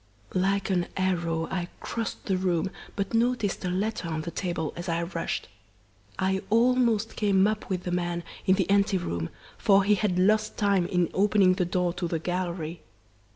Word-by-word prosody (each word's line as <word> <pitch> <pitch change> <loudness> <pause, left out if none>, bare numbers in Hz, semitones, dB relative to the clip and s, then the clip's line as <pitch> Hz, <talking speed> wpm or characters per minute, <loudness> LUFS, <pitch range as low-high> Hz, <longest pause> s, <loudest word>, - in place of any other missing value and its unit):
"Like 195 +2 +1
an 175 -2 +1
arrow 170 -3 0
I 180 -2 -2
crossed 230 -2 -4
the 195 - +1
room, 185 -1 0 0.2
but 200 +1 -2
noticed 230 -4 +1
a 180 - -1
letter 190 0 -1
on 160 -1 -2
the 170 - -5
table 170 -5 -2
as 175 +1 -5
I 170 0 0
rushed. 170 - -3 0.7
I 190 0 +1
almost 230 -1 +3
came 200 -2 +3
up 215 0 -1
with 180 -2 -2
the 180 - -3
man 175 -1 -1 0.2
in 190 - +6
the 190 -2 0
ante 200 -1 +3
room, 85 - -3 0.3
for 200 -1 +5
he 205 +2 +4
had 200 -3 +1
lost 215 +3 +2
time 200 -4 +2
in 180 -2 +1
opening 195 -1 +4
the 180 -1 0
door 180 0 0
to 175 - -3
the 165 - -1
gallery. 175 -1 -3
185 Hz, 180 wpm, -27 LUFS, 175-200 Hz, 0.7 s, in